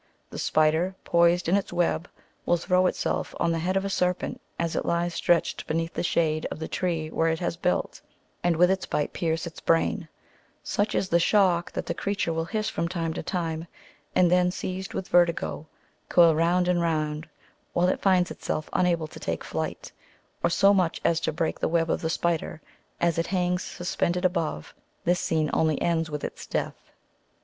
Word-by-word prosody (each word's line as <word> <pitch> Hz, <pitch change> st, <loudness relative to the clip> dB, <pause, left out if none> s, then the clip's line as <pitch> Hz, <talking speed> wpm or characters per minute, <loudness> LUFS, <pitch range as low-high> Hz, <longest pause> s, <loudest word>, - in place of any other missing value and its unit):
The -, -, -6 dB
spider, 160 Hz, +4 st, +2 dB
poised 170 Hz, +1 st, +3 dB
in 175 Hz, -, +3 dB
its 200 Hz, -, -1 dB
web, 175 Hz, -1 st, 0 dB, 0.3 s
will 175 Hz, -, +2 dB
throw 185 Hz, +2 st, +2 dB
itself -, -, -2 dB
on 170 Hz, -, +2 dB
the 165 Hz, -, 0 dB
head 185 Hz, +4 st, 0 dB
of 195 Hz, -, -1 dB
a -, -, -1 dB
serpent 180 Hz, -1 st, -1 dB, 0.2 s
as 170 Hz, -1 st, -1 dB
it -, -, 0 dB
lies 170 Hz, 0 st, 0 dB
sti 175 Hz, -, +3 dB
etched -, -, -4 dB
beneath 165 Hz, +1 st, -1 dB
the -, -, -2 dB
shade 155 Hz, -2 st, +1 dB
of -, -, -5 dB
the 160 Hz, -, -5 dB
tree 165 Hz, -4 st, -2 dB
where 165 Hz, 0 st, +1 dB
it 160 Hz, -, 0 dB
has 170 Hz, -1 st, -2 dB
built, 180 Hz, +1 st, -1 dB, 0.4 s
and 175 Hz, -1 st, +3 dB
with 180 Hz, +3 st, +5 dB
its 190 Hz, 0 st, -1 dB
bite 150 Hz, -, -1 dB
pierce 165 Hz, -1 st, -1 dB
its 170 Hz, -, -8 dB
brain; 165 Hz, 0 st, +1 dB, 0.5 s
such 205 Hz, +2 st, -1 dB
is 190 Hz, -, 0 dB
the 170 Hz, -, +4 dB
shock, 175 Hz, -2 st, +3 dB
that -, -, -3 dB
the -, -, -2 dB
creature 200 Hz, -4 st, -1 dB
will 165 Hz, 0 st, -1 dB
hiss 215 Hz, +4 st, -2 dB
from 170 Hz, -, -1 dB
time 165 Hz, -2 st, -2 dB
to -, -, -4 dB
time, 165 Hz, -2 st, -3 dB, 0.5 s
and 175 Hz, -1 st, +4 dB
then, 180 Hz, 0 st, +4 dB
seized 185 Hz, +1 st, -5 dB
with 185 Hz, -, -3 dB
vertigo, 170 Hz, -3 st, +1 dB, 0.4 s
coil 170 Hz, -2 st, +6 dB
round 175 Hz, +3 st, +2 dB
and 180 Hz, -1 st, +2 dB
round, 155 Hz, -2 st, -1 dB, 0.4 s
while 175 Hz, +1 st, +3 dB
it 185 Hz, -, 0 dB
finds 185 Hz, -2 st, +3 dB
itself 155 Hz, -, -4 dB
unable 170 Hz, -3 st, +2 dB
to 155 Hz, -, -11 dB
take -, -, -3 dB
to -, -, -10 dB
flight, -, -, -4 dB, 0.5 s
or -, -, +4 dB
so 195 Hz, +4 st, +5 dB
much 185 Hz, -4 st, +1 dB
as 165 Hz, -1 st, +3 dB
to -, -, -1 dB
break 160 Hz, +1 st, -2 dB
the -, -, 0 dB
web 165 Hz, 0 st, +1 dB
of -, -, -1 dB
the 160 Hz, -, -1 dB
spider, 165 Hz, -1 st, -1 dB, 0.4 s
as 170 Hz, -1 st, +1 dB
it 165 Hz, -, 0 dB
hangs 180 Hz, -1 st, 0 dB
suspended 180 Hz, 0 st, -2 dB
above; 160 Hz, -, -1 dB, 0.3 s
this 175 Hz, +1 st, +2 dB
scene 155 Hz, -2 st, 0 dB
only 155 Hz, -2 st, +2 dB
ends 165 Hz, -1 st, 0 dB
with 150 Hz, -1 st, -5 dB
its -, -, -6 dB
death. -, -, -4 dB
170 Hz, 200 wpm, -26 LUFS, 165-180 Hz, 0.5 s, coil